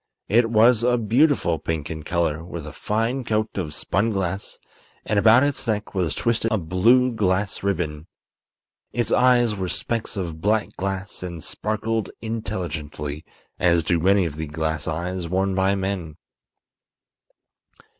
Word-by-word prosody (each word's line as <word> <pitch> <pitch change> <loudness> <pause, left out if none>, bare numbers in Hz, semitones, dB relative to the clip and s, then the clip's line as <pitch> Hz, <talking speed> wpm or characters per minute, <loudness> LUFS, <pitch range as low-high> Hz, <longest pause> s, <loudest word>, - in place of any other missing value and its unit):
It 115 +2 +4
was 115 +1 +5
a 125 +1 +3
beautiful 115 - +2
pink 80 -2 -3
in 80 0 -5
color, 80 -1 -1
with 85 -3 -7
a 75 - -8
fine 115 +5 -1
coat 110 -1 -1
of 80 -6 -3
spun 105 +4 0
glass, 95 -2 -3 0.5
and 105 -1 +2
about 115 +5 +6
its 135 -2 -1
neck 105 -1 -2
was 90 -6 0
twisted 115 -1 0
a 110 - +2
blue 110 +9 +3
glass 100 -1 0
ribbon. 85 -5 -2 0.8
Its 120 -2 -1
eyes 125 -2 +4
were 95 -2 -3
specks 115 +1 -2
of 85 -4 -4
black 105 +2 +1
glass 95 +1 -4
and 85 -3 -6
sparkled 110 +3 -2
intelligently, 80 -9 -4 0.4
as 85 -2 +3
do 85 +2 +1
many 95 +2 +3
of 75 -3 -5
the 80 0 -4
glass 80 0 -2
eyes 85 +2 -3
worn 95 +2 +1
by 95 +1 +2
men. 95 -5 -3
95 Hz, 145 wpm, -23 LUFS, 85-110 Hz, 0.8 s, about